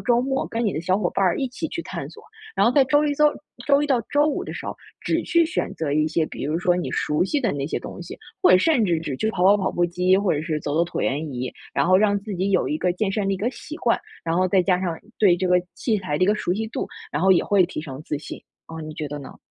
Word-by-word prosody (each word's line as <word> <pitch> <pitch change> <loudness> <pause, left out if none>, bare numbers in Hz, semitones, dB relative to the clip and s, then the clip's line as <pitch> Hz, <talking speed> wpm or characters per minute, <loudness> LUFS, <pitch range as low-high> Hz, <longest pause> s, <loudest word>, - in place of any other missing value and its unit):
周 240 -1 +2
末 270 +1 -1
跟 230 +1 -2
你 205 - +1
的 155 - -2
小 185 +3 +1
伙 175 -4 0
伴 195 - 0
儿 180 - +2
一 265 - -1
起 265 +6 -4
去 335 - -4
探 - - -6
索， 440 - -14 0.3
然 - - +3
后 - - +5
在 275 -1 +5
周 290 +3 +3
1 290 - 0
周 300 +1 +3 0.4
周 285 0 +4
1 295 - 0
到 265 -4 +2
周 290 +1 +3
5 305 - -1
的 - - -6
时 - - -7
候， - - -4 0.3
只 - - 0
去 340 -1 +3
选 320 - -2
择 150 -3 -2
一 155 +1 +2
些， 155 0 0
比 - - -8
如 155 +4 -1
说 180 -1 +2
你 180 - -3
熟 150 +4 0
悉 290 +8 0
的 230 -6 0
那 140 -1 -3
些 - - -2
东 180 - -8
西， 175 - -9 0.3
或 - - +6
者 185 - +7
甚 245 - +3
至 170 -4 +1
只 145 -5 -4
去 220 +7 0
跑 180 - -2
跑 200 +2 +7
跑 190 -2 -1
步 175 - +1
机， 180 +2 +2
或 200 -1 +1
者 145 - -1
是 155 -1 -2
走 145 +1 -3
走 170 +2 +3
椭 175 - -4
圆 145 +2 -1
仪， 125 0 -3 0.2
然 - - +2
后 185 0 +6
让 205 0 +3
自 205 -1 -6
己 190 +2 0
有 185 - +2
一 150 - 0
个 180 -1 +1
健 195 +2 -1
身 200 0 -1
的 - - +1
一 - - -3
个 215 +6 -1
习 300 +3 -9
惯， 240 -8 +1 0.3
然 165 +1 0
后 185 0 +3
再 190 0 +4
加 180 -1 +2
上 170 -3 -2 0.2
对 185 -5 +5
这 185 +1 -1
个 180 0 +4
器 225 -4 0
材 150 -6 -3
的 185 - +4
一 - - 0
个 210 - +3
熟 180 -4 -1
悉 220 +2 -2
度， - - -3 0.3
然 150 +4 -1
后 190 - +6
也 175 - +3
会 195 -3 +3
提 160 - -5
升 140 -2 -8
自 150 - -3
信， - - -8 0.3
啊， 160 0 -8
你 155 0 -7
觉 150 -1 -4
得 145 0 -5
呢？ 135 - -11
185 Hz, 325 characters per minute, -23 LUFS, 160-220 Hz, 0.4 s, 者